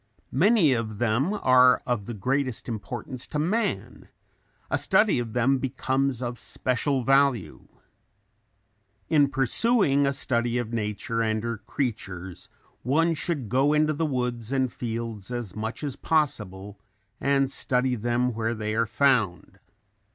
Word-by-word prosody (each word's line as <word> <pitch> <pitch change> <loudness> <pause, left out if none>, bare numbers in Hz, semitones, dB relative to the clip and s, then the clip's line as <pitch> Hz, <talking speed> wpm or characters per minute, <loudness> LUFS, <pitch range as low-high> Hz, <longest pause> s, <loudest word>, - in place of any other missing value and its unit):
Many 175 - +4
of 110 -3 -3
them 120 - +1
are 130 -10 +4
of 120 -5 -2
the 120 - -5
greatest 130 +4 -2
importance 120 +2 -6
to 150 - -4
man; 195 +10 -2 0.6
a - - +3
study 210 - +3
of 115 -2 -5
them 130 +2 +2
becomes 130 0 -1
of 120 0 -4
special 130 +1 -1
value. 135 - +1 1.4
In 145 -3 +4
pursuing 140 - +2
a - - +2
study 120 -3 -1
of 120 -1 -3
nature 115 +1 -2
and 110 -1 0
her 115 -2 -3
creatures 100 - -5 0.3
one 165 +7 +2
should 155 -6 -2
go 135 +6 +2
into 155 0 +2
the 160 +2 -1
woods 125 -4 -2
and 130 -3 0
fields 115 -3 -5
as 120 -6 -5
much 110 +6 -5
as 140 -3 -3
possible 105 - -2 0.4
and 140 -1 +1
study 130 -1 +1
them 120 +2 0
where 115 +1 -2
they 110 0 -3
are 115 +1 +1
found. 110 -6 +1
125 Hz, 135 wpm, -26 LUFS, 115-140 Hz, 1.4 s, Many